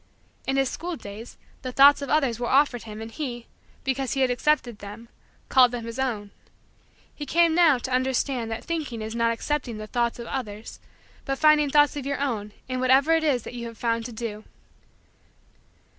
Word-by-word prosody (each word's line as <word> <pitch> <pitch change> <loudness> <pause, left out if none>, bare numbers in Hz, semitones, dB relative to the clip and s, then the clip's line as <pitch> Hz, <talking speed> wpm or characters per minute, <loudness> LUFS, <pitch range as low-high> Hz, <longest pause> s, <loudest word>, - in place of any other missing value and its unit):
In 270 - +1
his 270 -1 +2
school 345 +6 -4
days, 215 -2 -10 0.2
the 255 - -5
thoughts 280 +3 +7
of 280 - -5
others 270 -7 +1
were 240 - -2
offered 265 -4 +2
him 215 0 -7
and 225 - -9
he, 240 -4 -5 0.4
because 265 -2 -1
he 270 - -1
had 255 -1 +3
accepted 245 -3 0
them, 210 +3 -10 0.4
called 250 -2 +5
them 240 -2 -5
his 230 +2 -6
own. 215 -6 -2 0.8
He 290 - -7
came, 335 +2 +4
now, 325 -5 +5
to 255 +1 -6
understand 255 -2 0
that 225 - -5
thinking 295 -9 -4
is 220 +1 -5
not 230 0 +1
accepting 240 0 -3
the 215 - -6
thoughts 235 +1 -1
of 235 - -7
others 220 -4 -6 0.4
but 270 0 -2
finding 305 -1 +4
thoughts 295 +1 +4
of 280 -2 -5
your 280 - -2
own 225 -7 -2 0.2
in 255 0 -3
whatever 265 +4 +4
it 325 0 +3
is 265 -7 +1
that - - -8
you 235 -1 -5
have 230 -1 -10
found 230 -1 -1
to - - -9
do. 220 -2 -6
255 Hz, 195 wpm, -25 LUFS, 230-280 Hz, 0.8 s, thoughts